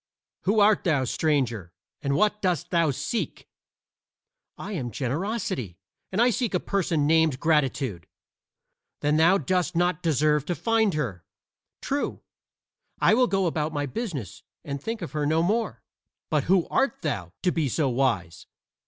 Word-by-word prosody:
"Who 210 Hz, +2 st, +3 dB
art 205 Hz, 0 st, +4 dB
thou, 150 Hz, -7 st, +2 dB
stranger, 125 Hz, -, 0 dB, 0.3 s
and 140 Hz, -1 st, 0 dB
what 210 Hz, +2 st, +2 dB
dost 180 Hz, -6 st, -1 dB
thou 170 Hz, -3 st, +3 dB
seek?" 180 Hz, -, -3 dB, 1.1 s
"I -, -, -7 dB
am 140 Hz, -11 st, -3 dB
Generosity, 135 Hz, -, -3 dB, 0.3 s
and 190 Hz, -, -1 dB
I 245 Hz, +1 st, +5 dB
seek 225 Hz, -3 st, -1 dB
a -, -, +2 dB
person 170 Hz, -7 st, 0 dB
named 160 Hz, -3 st, +3 dB
Gratitude." 135 Hz, -, 0 dB, 0.9 s
"Then 150 Hz, +1 st, +2 dB
thou 170 Hz, +5 st, +5 dB
dost 180 Hz, 0 st, 0 dB
not 175 Hz, -1 st, +1 dB
deserve 150 Hz, -2 st, +2 dB
to 175 Hz, -, -1 dB
find 220 Hz, -4 st, +1 dB
her." 105 Hz, -, -3 dB, 0.6 s
"True. 280 Hz, +1 st, -2 dB, 0.8 s
I -, -, +5 dB
will 250 Hz, +2 st, +4 dB
go 195 Hz, -3 st, +1 dB
about 155 Hz, -2 st, -1 dB
my 145 Hz, -1 st, -1 dB
business 145 Hz, -, -5 dB, 0.2 s
and 140 Hz, -1 st, -5 dB
think 225 Hz, +2 st, -4 dB
of 160 Hz, -, -6 dB
her 150 Hz, -1 st, -1 dB
no 160 Hz, +2 st, +2 dB
more. 220 Hz, +6 st, -1 dB, 0.5 s
But 150 Hz, -4 st, +1 dB
who 185 Hz, -1 st, +3 dB
art 270 Hz, -8 st, 0 dB
thou, 100 Hz, -, -3 dB
to 180 Hz, -, +3 dB
be 155 Hz, -5 st, 0 dB
so 145 Hz, +3 st, +1 dB
wise?" 115 Hz, -10 st, -1 dB
160 Hz, 155 wpm, -26 LUFS, 135-195 Hz, 1.1 s, I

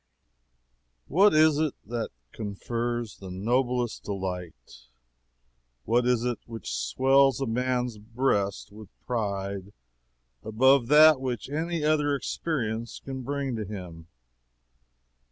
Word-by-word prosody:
What 190 Hz, +3 st, +4 dB
is 155 Hz, -1 st, +5 dB
it 155 Hz, -3 st, 0 dB
that 115 Hz, +1 st, -3 dB, 0.2 s
confers 115 Hz, +2 st, -4 dB
the 95 Hz, -, -9 dB
noblest 120 Hz, +5 st, -1 dB
delight? 90 Hz, -12 st, -6 dB, 1.0 s
What 120 Hz, +2 st, +2 dB
is 125 Hz, -2 st, +2 dB
that 120 Hz, -2 st, -1 dB
which 115 Hz, -, -6 dB
swells 130 Hz, -, +3 dB
a 135 Hz, -, -1 dB
man's 125 Hz, -1 st, -1 dB
breast 105 Hz, -4 st, -1 dB
with 105 Hz, -1 st, -12 dB, 0.2 s
pride 100 Hz, -4 st, -3 dB, 0.7 s
above 125 Hz, +3 st, +4 dB
that 150 Hz, 0 st, +7 dB
which 130 Hz, 0 st, -4 dB
any 165 Hz, +1 st, -2 dB
other 150 Hz, -2 st, +2 dB
experience 115 Hz, -6 st, -3 dB
can 135 Hz, -1 st, -5 dB
bring 140 Hz, -1 st, -3 dB
to 110 Hz, -, -3 dB
him? 90 Hz, -5 st, -8 dB
120 Hz, 110 wpm, -27 LUFS, 100-135 Hz, 1.0 s, that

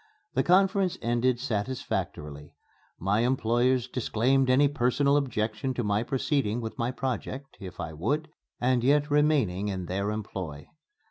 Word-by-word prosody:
The -, -, +2 dB
conference 190 Hz, 0 st, +3 dB
ended 120 Hz, +1 st, +1 dB
satisfactorily. 105 Hz, -, -4 dB, 0.4 s
My 100 Hz, +4 st, +1 dB
employers 125 Hz, +1 st, +2 dB
disclaimed 130 Hz, +2 st, +1 dB
any 135 Hz, +3 st, +5 dB
personal 140 Hz, +1 st, +2 dB
objection 125 Hz, -2 st, -1 dB
to 120 Hz, -, -1 dB
my 105 Hz, 0 st, +1 dB
proceeding 125 Hz, -2 st, 0 dB
with 110 Hz, -2 st, -6 dB
my 120 Hz, +1 st, 0 dB
project, 130 Hz, +1 st, -4 dB
if 95 Hz, -3 st, -9 dB
I 80 Hz, -2 st, -4 dB
would, 140 Hz, -, -1 dB, 0.3 s
and 125 Hz, -1 st, +2 dB
yet 145 Hz, +3 st, +3 dB
remaining 140 Hz, -11 st, +2 dB
in 95 Hz, -3 st, -3 dB
their 100 Hz, +3 st, -2 dB
employ. 95 Hz, -9 st, -5 dB
120 Hz, 135 wpm, -28 LUFS, 105-135 Hz, 0.4 s, any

